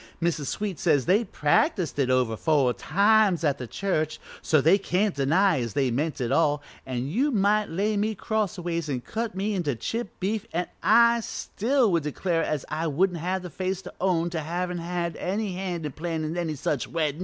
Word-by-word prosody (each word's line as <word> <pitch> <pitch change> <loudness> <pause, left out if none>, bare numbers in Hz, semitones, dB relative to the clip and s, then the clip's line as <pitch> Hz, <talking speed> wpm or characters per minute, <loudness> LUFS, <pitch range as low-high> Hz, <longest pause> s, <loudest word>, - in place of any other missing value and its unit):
Mrs. 165 -4 -1
Sweet 205 0 -3
says 150 -7 +2
they 200 +6 +3
practised 175 - +1
it 130 -2 +2
over 125 -3 +2
four 140 -1 +2
times 200 - +3
at 145 -3 +1
the 125 - -5
church, 155 - -1 0.2
so 155 - +3
they 165 +8 +5
can't 195 +1 0
deny 165 +5 +3
as 115 -4 -4
they 135 -3 +2
meant 150 +6 -1
it 120 -2 -1
all, 150 -3 +2 0.2
an' 125 -1 -2
you 245 - +1
might 210 -3 +2
lay 205 +6 0
me 215 +2 0
crossways 175 -7 -2
an' 130 -3 -2
cut 225 - -4
me 200 +3 -1
into 165 -9 -1
chipped 225 - -4
beef 210 +3 -2
an' 175 +2 0 0.6
still 255 +5 -1
I 225 - +4
would 170 -3 +2
declare 165 +3 -1
as 150 -4 -2
I 165 +1 -2
wouldn't 175 +4 +1
have 185 +3 -2
the 180 - -7
face 190 0 -3
to - - -9
own 175 -2 +1
to 165 - -2
havin' 175 +3 -3
had 170 -1 -3
any 200 +1 -2
hand 180 -3 -4
in 150 - -3
plannin' 160 0 -3
any 165 -3 -2
such 140 -2 -2
weddin'. 155 -2 -1
170 Hz, 195 wpm, -26 LUFS, 150-195 Hz, 0.6 s, they